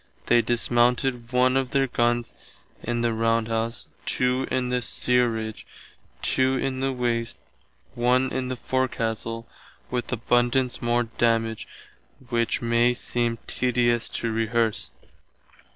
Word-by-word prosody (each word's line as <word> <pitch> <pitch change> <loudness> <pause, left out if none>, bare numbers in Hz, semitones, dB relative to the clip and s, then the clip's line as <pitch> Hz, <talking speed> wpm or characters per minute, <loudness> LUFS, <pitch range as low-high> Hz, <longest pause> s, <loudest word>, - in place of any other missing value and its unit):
They 120 0 +5
dismounted 120 +1 +1
one 125 +1 +3
of 135 -1 0
our 135 0 +4
gunns 120 -1 0 0.5
in 120 0 -2
the 115 -1 +1
roundhouse, 115 0 0 0.2
two 125 +1 +1
in 125 -1 0
the 125 0 0
stearidge, 115 -3 0 0.6
two 130 0 +2
in 130 0 -2
the 135 0 0
waste, 120 -2 -1 0.6
one 125 +2 +2
in 130 -1 -2
the 130 - -2
forecastle, 115 -3 -2 0.4
with 125 -1 -2
abundance 120 +1 +1
more 120 0 +2
damage 115 -1 0 0.6
which 115 -1 0
may 120 +1 +3
seem 120 -1 -1
tedious 120 -2 +1
to 115 - -1
rehearse. 115 0 0
120 Hz, 120 wpm, -25 LUFS, 115-125 Hz, 0.6 s, They